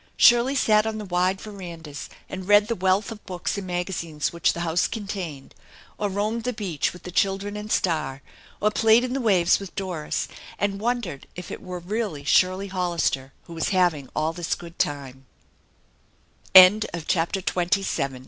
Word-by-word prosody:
Shirley 240 +3 +6
sat 215 -4 +3
on 220 -1 -3
the 210 - -5
wide 185 +1 +1
verandas 170 -8 -8 0.2
and 190 -1 -7
read 205 0 +6
the 230 - 0
wealth 190 +2 +1
of 215 -2 -9
books 180 -1 -3
and 190 - -7
magazines 175 -4 -3
which 170 - +2
the 170 - -5
house 170 0 +1
contained, 190 - -6 0.5
or 205 - 0
roamed 210 +4 -1
the 250 +1 -1
beach 190 -9 -2
with 180 - -13
the 180 - -7
children 195 +3 0
and 210 +1 -6
Star, 150 -6 0 0.4
or 210 - +2
played 225 +2 +4
in 255 0 -2
the 270 - -1
waves 190 -7 +3
with 195 -2 -9
Doris, 180 -6 -3 0.3
and 200 0 -1
wondered 225 - -2
if 180 - -8
it - - -6
were 180 -1 -6
really 180 -4 -3
Shirley 185 +6 +2
Hollister 170 -7 -1
who 170 - -11
was 165 -1 -2
iiaving 175 -8 +1
all 155 +1 0
this 170 0 -2
good 170 0 -12
time. 135 -2 -3
185 Hz, 160 wpm, -24 LUFS, 170-210 Hz, 0.5 s, Shirley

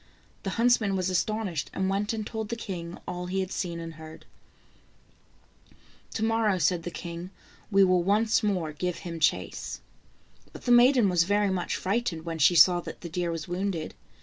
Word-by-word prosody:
The 195 - -3
huntsman 230 -4 +3
was 185 0 0
astonished, 185 -4 -1
and 190 - 0
went 200 +2 0
and 220 -2 -3
told 220 -1 -5
the 235 - -2
king 175 -6 -6
all 180 0 -4
he 190 +2 -1
had 185 0 -4
seen 170 -2 -3
and 165 0 -7
heard. 160 0 -12 1.9
"To 220 - -1
morrow," 225 -3 +2
said 180 -1 +1
the 175 - -5
king, 170 +1 -7 0.4
"we 195 -2 +5
will 185 -1 +4
once 215 +5 +2
more 185 -7 -1
give 180 +3 -3
him 165 -1 -5
chase." - - -1 0.7
But - - -11
the 245 - +2
maiden 245 -1 +6
was 175 -3 +3
very 205 +1 +2
much 185 -2 -1
frightened 190 -5 -2
when 165 -1 -4
she 165 +4 +5
saw 175 +1 +7
that - - -8
the 170 - -6
deer 175 +1 -2
was 165 -2 -4
wounded. 180 -2 -3
185 Hz, 180 wpm, -27 LUFS, 170-210 Hz, 1.9 s, saw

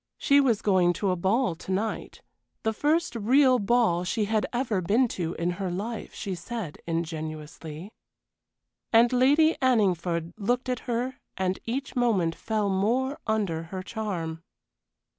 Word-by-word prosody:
She 280 0 +4
was 235 -6 +1
going 185 -3 +3
to 195 +1 0
a - - +1
ball 190 +5 +1
to 165 +3 -8
night. 210 +4 -3 0.4
The 220 - +1
first 305 +6 +1
real 255 +3 +4
ball 205 -5 +2
she 210 +4 0
had 215 0 0
ever 240 -6 0
been 220 +9 +3
to 170 -4 -3
in 170 +1 -1
her 190 - -1
life, 210 +5 -4
she 195 - -4
said, 185 -2 -6
ingenuously. 160 +1 -5 1.0
And 235 +2 +5
Lady 290 +6 +4
Anningford 180 -9 +1
looked 245 +5 0
at 250 -2 -1
her 245 +2 -2 0.2
and 190 0 -1
each 265 +4 -3
moment 210 -10 +2
fell 215 +3 -1
more 250 +9 0
under 200 -7 0
her 185 +2 -6
charm. 180 -8 -4
210 Hz, 145 wpm, -27 LUFS, 175-245 Hz, 1.0 s, And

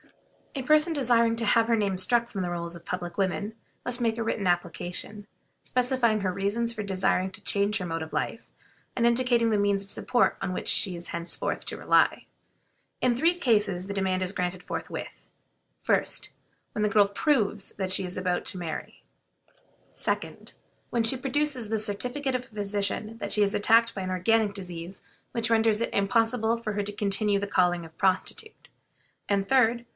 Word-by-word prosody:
A 270 - -3
person 305 +4 +4
desiring 235 -5 +3
to 230 - +1
have 225 +2 +4
her 230 -1 +3
name 200 -3 0
struck 235 +5 +3
from 200 -5 -5
the 180 - -2
rolls 170 0 -3
of 170 - -11
public 175 -1 -5
women 200 +2 -1 0.3
must 245 0 -1
make 225 -1 +1
a 230 - -1
written 215 -3 -1
application, 175 +3 -2 0.4
specifying 245 -4 +1
her 185 -2 -1
reasons 220 +5 0
for 215 -2 -4
desiring 190 -1 +1
to - - -12
change 205 +1 +1
her 185 - -4
mode 165 -1 -3
of 160 - -6
life, - - -3 0.5
and 235 - +2
indicating 235 -1 +3
the 210 - +2
means 200 -1 +1
of 200 - -10
support 245 - +1
on 195 -1 -2
which - - -4
she 185 -3 +2
is 170 0 -7
henceforth 170 0 -2
to - - -2
rely. - - +3 0.7
In 250 -1 +2
three 330 +8 +3
cases 210 - +1
the 200 - -4
demand 190 -1 0
is 185 +1 -1
granted 180 -1 -2
forthwith: - - -6 0.6
1st. - - +1 0.4
When 210 - -2
the 210 - +2
girl 205 -1 +5
proves 210 -3 +1
that 190 -1 -2
she 190 - +1
is 180 0 -5
about 180 -1 -1
to 185 - -3
marry; 170 -3 -6 0.9
2d. - - -3 0.4
When 235 -1 +1
she 225 +4 +4
produces 270 -3 -1
the 220 0 0
certificate 250 +6 -1
of 250 0 -2
a 225 - -21
physician 205 +2 -2
that 200 0 -4
she 210 - +3
is 200 - +1
attacked 230 +2 +4
by 195 - -3
an 185 - -3
organic 205 +3 +2
disease 180 -1 -7 0.3
which 230 -1 -1
renders 220 -1 +4
it 230 - -2
impossible 225 +2 +2
for 215 -2 -4
her 205 0 -1
to 205 - -2
continue 205 0 +1
the 200 - -3
calling 175 -3 +2
of 160 - -12
a - - -37
prostitute; 315 - -1 0.6
and, 200 -1 +1
3d. 240 -2 +3
205 Hz, 190 wpm, -27 LUFS, 190-235 Hz, 0.9 s, girl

